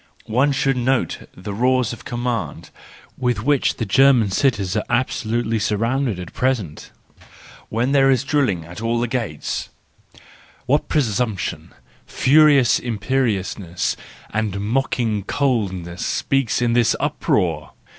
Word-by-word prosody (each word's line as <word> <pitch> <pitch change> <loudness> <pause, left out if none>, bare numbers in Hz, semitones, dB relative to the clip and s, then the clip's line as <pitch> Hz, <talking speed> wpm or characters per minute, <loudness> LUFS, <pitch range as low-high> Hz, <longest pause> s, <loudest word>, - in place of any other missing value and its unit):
One 130 +6 +2
should 135 -1 +1
note 130 +1 -1
the 100 +3 -6
roars 125 +2 +1
of 120 - -11
command, 115 - -3 0.5
with 125 -4 0
which 145 0 +2
the 115 - -3
German 125 -1 +4
cities 100 -5 +1
are 105 - 0
absolutely 115 -2 0
surrounded 115 +1 0
at 90 - -8
present, 115 - -2 0.8
when 120 +4 0
there 135 -1 +4
is 135 -1 +3
drilling 130 - 0
at 85 +6 -9
all 115 +1 0
the 120 - 0
gates: 115 - -3 1.0
what 145 +4 +1
presump¬ 115 -6 0
tion, - - -5 0.4
furious 140 -2 +4
imperiousness, 105 -6 -1 0.4
and 105 -2 -1
mocking 115 -1 0
coldness 95 -10 -1
speaks 135 -3 0
in 120 -1 +2
this 120 -1 +3
uproar! 80 -4 -1
120 Hz, 125 wpm, -21 LUFS, 100-130 Hz, 1.0 s, German